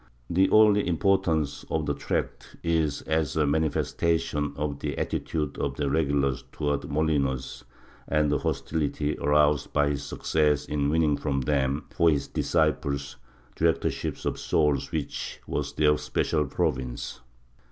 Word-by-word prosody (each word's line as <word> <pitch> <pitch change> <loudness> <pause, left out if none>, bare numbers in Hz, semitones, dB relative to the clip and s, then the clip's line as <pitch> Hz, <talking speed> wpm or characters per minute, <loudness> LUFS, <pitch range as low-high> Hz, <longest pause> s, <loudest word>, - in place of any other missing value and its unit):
^ - - -30 0.3
The 95 +2 +4
only 105 -2 +5
importance 85 -4 +1
of - - -1
the - - 0
tract - - -3
is 80 -3 0
as 80 -1 0
a 75 - +3
manifestation 80 0 0
of 70 -1 -2
the - - -3
attitude 75 -3 -2
of - - -1
the 70 -2 -1
regulars 70 -4 +1
towards 75 -1 -2
Molinos 70 -5 -1 0.4
and 75 -1 +2
the 75 - +2
hostility 75 -1 -1
aroused 75 0 +2
by 75 -1 +3
his 70 - -2
success 75 -2 0
in 70 -1 0
winning 75 -2 +2
from 70 -2 -1
them, 70 +1 0
for 85 - +3
his 75 -3 0
disciples, 70 -4 0 0.4
the 80 - 0
directorship 80 - -1
of - - -1
souls 70 -3 +1
which 75 -3 -4
was 70 -1 -3
their 75 0 +4
special 75 - 0
province. 65 -3 -2
75 Hz, 140 wpm, -27 LUFS, 70-80 Hz, 0.4 s, only